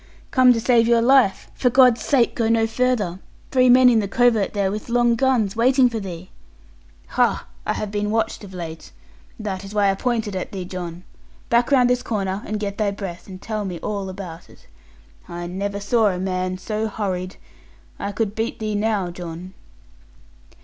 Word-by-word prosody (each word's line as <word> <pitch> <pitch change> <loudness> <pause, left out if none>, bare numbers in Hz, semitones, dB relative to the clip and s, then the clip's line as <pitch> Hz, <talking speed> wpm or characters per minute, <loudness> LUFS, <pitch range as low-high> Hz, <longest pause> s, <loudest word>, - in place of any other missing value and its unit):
'Come 255 -1 +6
to 235 - +2
save 230 -1 +3
your 235 0 +4
life. 255 -5 +3
For 250 - +1
God's 250 -1 +5
sake, 260 -5 +2
go 225 -2 0
no 225 -1 +3
farther. 225 -6 0 0.3
Three 255 -1 +4
men 255 +1 +7
in 235 -2 +5
the 205 - -1
covert 230 -1 +2
there, 200 -2 0
with 215 +3 -6
long 240 0 +3
guns, 230 -4 +1
waiting 255 +2 +4
for 225 - -3
thee.' 185 -2 -8 0.8
'Ha! - - +1 0.2
I - - +1
have 210 -1 -4
been 210 0 -1
watched 225 0 -1
of 195 - -10
late. 165 -3 -8 0.5
That 200 -3 -4
is 200 +2 -9
why 200 -1 +3
I - - 0
pointed 220 -1 -2
at 185 - -4
thee, 190 -3 -5
John. 175 -1 -7 0.5
Back 235 0 +3
round 255 -3 +5
this 250 0 +1
corner, 195 -3 -2
and 215 0 -3
get 200 0 -4
thy 210 -1 +2
breath, 195 -3 -7
and 185 -1 -9
tell 215 +1 -4
me 185 -3 -4
all 200 -2 -3
about 185 -3 -9
it. - - -19 0.6
I 175 0 -5
never 200 +3 -3
saw 220 +2 +2
a 185 -3 0
man 185 0 -2
so 215 +3 -3
hurried. 190 -4 -3 0.6
I 200 - -3
could 210 0 -2
beat 225 +2 -3
thee 215 -1 -3
now, 205 -3 0
John.' 175 +1 -8
210 Hz, 190 wpm, -22 LUFS, 190-235 Hz, 0.8 s, men